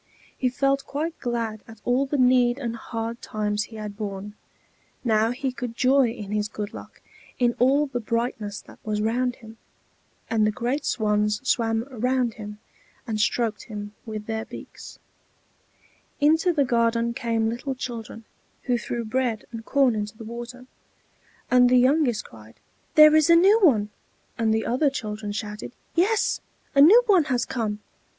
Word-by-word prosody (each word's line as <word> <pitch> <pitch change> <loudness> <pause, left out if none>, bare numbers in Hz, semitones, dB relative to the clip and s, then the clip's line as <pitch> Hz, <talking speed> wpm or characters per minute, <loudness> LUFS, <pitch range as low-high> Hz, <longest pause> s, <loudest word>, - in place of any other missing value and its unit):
He 255 - 0
felt 275 +1 0
quite 315 +4 -3
glad 230 -3 -3
at 225 -1 -13
all 255 +3 +2
the 290 - -1
need 250 -1 +4
and 235 -4 -4
hard 230 0 -5
times 210 0 -2
he 225 - -13
had 210 -1 -6
borne; 205 -1 -6 0.7
now 220 -2 +2
he 265 +2 -2
could 245 -2 -6
joy 260 0 +4
in 215 -3 -7
his 210 0 0
good 210 0 -6
luck - - -11 0.4
in 240 -1 +2
all 275 +4 +4
the 260 -4 -4
brightness 225 -2 -3
that - - -16
was 210 -1 -2
round 240 +3 0
him. 225 -2 -14 0.7
And 220 -1 +2
the - - +2
great 245 +6 -2
swans 210 -1 +1
swam 225 -1 +1
round 250 0 0
him 210 -1 -8 0.5
and 220 -3 -2
stroked 225 0 0
him 205 -2 -7
with 215 -1 -5
their 220 0 -3
beaks. - - -11 1.2
Into 320 +4 +4
the 290 -5 +2
garden 235 -1 +1
came 230 -1 -1
little 250 +4 -3
children, 230 -3 -7 0.4
who 245 -2 0
threw 235 +1 -4
bread 235 -1 -1
and 230 -1 -7
corn 270 0 +3
into 210 0 -4
the 225 - -9
water; 240 +2 -8 0.9
and 250 0 +6
the 255 - +5
youngest 255 -3 +2
cried, 110 0 -15 0.4
"There 305 0 +8
is 315 +1 +4
a 335 - +8
new 390 +6 +6
one!" 215 - +4 0.4
and 225 -1 +1
the 220 0 0
other 260 +5 +2
children 215 -5 -5
shouted, 210 +2 -6 0.2
"Yes, 400 +6 +1 0.3
a 275 - +5
new 420 +12 +8
one 380 -8 +4
has 245 -3 0
come!" 215 -4 -3
235 Hz, 165 wpm, -24 LUFS, 215-260 Hz, 1.2 s, There